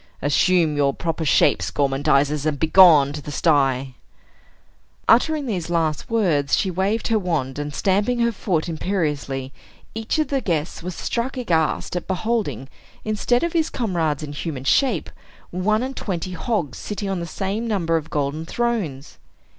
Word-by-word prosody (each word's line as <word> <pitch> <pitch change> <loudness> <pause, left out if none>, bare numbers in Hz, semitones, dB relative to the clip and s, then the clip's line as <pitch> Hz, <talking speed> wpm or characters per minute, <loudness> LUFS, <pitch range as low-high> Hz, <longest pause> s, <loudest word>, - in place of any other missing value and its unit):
Assume 160 +2 +2
your 140 -1 +1
proper 165 -1 -2
shapes, 150 - +3
gormandizers, 145 +1 +1
and 145 -2 -1
begone 160 -4 +6
to 150 - -5
the 150 - -7
sty!" 135 -5 +1 1.1
Uttering 295 +6 +3
these 185 -9 -3
last 160 -3 -1
words, 170 -12 +2
she 190 - 0
waved 195 +7 -1
her 225 -1 +3
wand; 150 -8 -2
and 145 0 -4
stamping 205 +9 +1
her 235 0 +3
foot 180 -7 -1
imperiously, 150 -6 -2 0.4
each 225 +5 -2
of 310 - 0
the 275 -2 0
guests 165 -7 -2
was 180 0 -5
struck 250 +3 -3
aghast 170 -9 0
at 180 - -4
beholding, 190 - -2 0.4
instead 220 +4 +1
of 340 - -1
his 325 -2 +1
comrades 165 - -1
in 145 -1 -6
human 145 -3 -5
shape, 225 - +1 0.4
one 215 +6 +1
and 265 +1 -4
twenty 185 -2 -4
hogs 180 - -2
sitting 205 -1 -4
on 195 -2 -2
the 170 - -4
same 200 +6 -3
number 175 -7 0
of 160 -1 -2
golden 145 +1 -2
thrones. 180 - -3
170 Hz, 155 wpm, -22 LUFS, 145-215 Hz, 1.1 s, begone